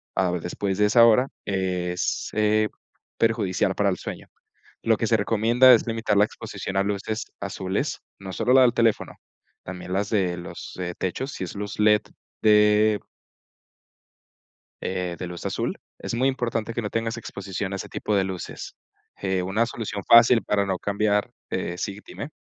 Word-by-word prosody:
a 95 - +2
la 90 - +1
vez 90 -2 -3
después 95 +2 -2
de 105 - +4
esa 115 +3 +6
hora 115 +3 +5 0.2
es, 90 -2 -1
eh, 110 0 +2 0.5
perjudicial 105 -4 +1
para 100 -1 +2
el 90 - -1
sueño. - - -7 0.5
Lo 115 -1 +2
que - - -1
se 115 - +3
recomienda 115 +4 +5
es 115 - +3
limitar 115 -2 0
la 105 - +6
exposición 95 -2 -7
a 95 - +3
luces 105 +2 -3
azules, 100 +6 -3 0.2
no 95 -1 -7
solo 120 - 0
la 130 - +7
del 125 -2 +5
teléfono, 115 -3 +1 0.5
también 90 0 -7
las 100 +2 0
de 95 -5 +1
los 85 - -8 0.2
techos, 130 +9 -3
si - - -5
es 90 - -6
luz 100 +1 -5
LED 105 0 +5 0.4
de 105 0 +5 1.8
eh, 90 -2 -2
de - - -4
luz 85 -1 -8
azul, - - -2 0.2
es - - -5
muy 125 +3 +2
importante 115 -4 -1
que 120 - -3
no 105 - -4
tengas 115 0 -2
exposición 100 -3 -5
a - - -2
ese - - -7
tipo 105 - -2
de 100 - +3
luces, 95 -2 -6 0.4
eh, 95 -2 0
una 100 +6 +1
solución 110 -4 -5
fácil 115 0 +7
para 100 -1 +1
no 95 -1 0
cambiar 105 +1 0 0.2
eh 85 - -3
sí, 100 +1 -4
dime. 140 - -7
105 Hz, 175 wpm, -24 LUFS, 95-115 Hz, 1.8 s, la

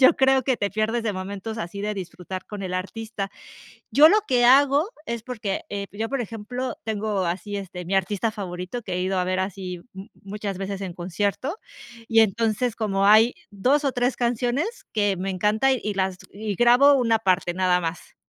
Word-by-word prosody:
yo 260 - +7
creo 265 0 +4
que 260 -3 +1
te 200 - -1
pierdes 220 +2 0
de 215 -2 -1
momentos 200 +4 -5
así 200 +1 -5
de 210 +1 -1
disfrutar 185 0 -7
con 205 -2 -7
el 185 -1 -4
artista. 195 +2 -4 0.6
Yo 305 +3 +8
lo 425 +4 +4
que 245 -2 +3
hago 280 +6 +5 0.2
es 235 -3 -4
porque, 220 -5 -3
eh, 200 -1 -4
yo, 220 +2 -3
por 275 -3 -1
ejemplo, 230 +3 -5
tengo 210 -4 -1
así, 200 +4 -3
este, 180 -2 -7
mi 190 +3 -2
artista 200 +3 +1
favorito 185 +2 -5
que 190 -5 -5
he 180 - -1
ido 190 0 0
a 180 - +1
ver 185 0 0
así 185 -2 -4 0.4
muchas 200 -1 -5
veces 195 0 -4
en 185 -3 -5
concierto, 200 - -2 0.5
y 225 0 +5
entonces, 225 +2 +1
como 195 -3 0
hay 220 +3 +6 0.2
2 260 +9 +1
o 270 - +1
3 245 +1 0
canciones 245 - -1
que 205 -2 +2
me 190 - -3
encanta 210 +8 +2
y 215 -5 -1
las 190 -1 0 0.2
y 205 +1 -4
grabo 245 +6 +6
una 230 -4 +3
parte 185 -4 +1
nada 180 -1 +2
más. 165 0 -5
210 Hz, 190 wpm, -24 LUFS, 190-240 Hz, 0.6 s, Yo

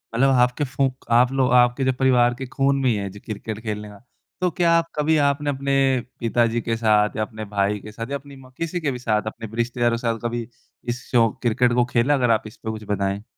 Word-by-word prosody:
मतलब 135 +4 +4
आपके 125 +4 +1
फूँक 135 -1 -2
आप 120 +2 +5
लोग 130 -2 +1
आपके 125 +2 +4
जो 130 - +2
परिवार 125 -2 +4
के 130 - -6
खून 135 +2 +1
में 130 - +2
ही 115 - +2
है 100 -1 -3
जी 100 +2 -12
क्रिकेट 110 +1 -6
खेलने 105 -1 -4
का, 100 -1 -13 0.4
तो 180 - +2
क्या 170 0 +2
आप 165 0 0
कभी 155 +1 +2
आपने 145 0 +1
अपने 140 0 -1 0.5
पिताजी 115 0 +1
के 115 0 -2
साथ 105 -2 +2
या - - 0
अपने 110 0 -7
भाई 100 0 0
के 105 +2 -10
साथ 115 +3 -7
या 140 - 0
अपनी 140 0 -14
माँ 130 -1 -15
किसी 165 +1 -2
के 145 -3 0
भी 125 - -5
साथ 110 -3 +1
अपने 115 0 -6
रिश्तेदारों 120 0 +1
के - - -9
साथ 115 -1 -1
कभी 120 -1 -3 0.4
इस 120 +1 -3
शौक़, 115 -3 +3
क्रिकेट 120 0 +2
को 120 0 +3
खेला? 125 +3 +2
अगर 125 -4 +2
आप 110 -1 +2
इस 110 - -13
पर 110 - -6
कुछ 110 -1 -7
बताएँ। 100 0 -1
120 Hz, 240 wpm, -22 LUFS, 110-135 Hz, 0.5 s, आप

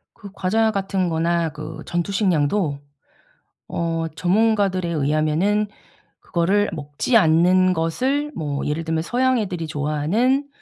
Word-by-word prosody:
그 200 - -11
과자 220 +4 +1
같은 195 -3 -1
거나 165 0 0
그 155 +1 -8
전투식량도 175 -4 0 0.9
어 165 -1 -2
전문가들에 195 -1 +1
의하면은 155 +7 +1 0.5
그거를 195 +4 +1
먹지 150 - -1
않는 185 0 +4
것을 255 - -1
뭐 145 -3 -3
예를 150 +3 -2
들면 160 0 -1
서양 255 +6 +1
애들이 180 -6 -3
좋아하는 160 - 0
175 Hz, 260 characters per minute, -22 LUFS, 160-205 Hz, 0.9 s, 않는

